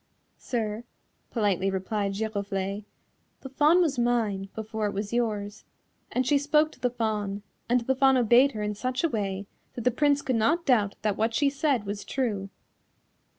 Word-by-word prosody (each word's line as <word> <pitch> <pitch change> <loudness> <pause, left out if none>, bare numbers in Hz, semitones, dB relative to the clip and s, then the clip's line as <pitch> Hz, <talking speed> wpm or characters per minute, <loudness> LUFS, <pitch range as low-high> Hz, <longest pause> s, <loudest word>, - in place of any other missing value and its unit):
"Sir," 220 -2 -3 0.5
politely 200 -4 +1
replied 195 +1 -2
Giroflée, 200 -1 -3 0.6
"the 265 - -8
Fawn 300 +6 +4
was 295 -7 +1
mine 220 -5 0
before 220 -1 -3
it 205 - -4
was 205 +2 -4
yours," 215 -3 -2 0.5
and 255 +1 0
she 285 +2 +3
spoke 300 +2 +2
to - - -18
the 250 - +1
Fawn, 210 -4 -2 0.3
and 245 0 +3
the 260 +3 +1
Fawn 265 0 +4
obeyed 250 +3 +5
her 210 - -3
in 210 0 -1
such 255 +6 -2
a 335 - +3
way 200 -4 -2 0.3
that 240 - -5
the 250 - +3
Prince 285 +3 +2
could 255 -3 0
not 325 +10 +2
doubt 215 -7 +2
that 210 -2 0
what 225 +1 0
she 285 -1 +3
said 275 -5 0
was 200 +1 -4
true. 210 -7 -2
225 Hz, 175 wpm, -27 LUFS, 205-260 Hz, 0.6 s, obeyed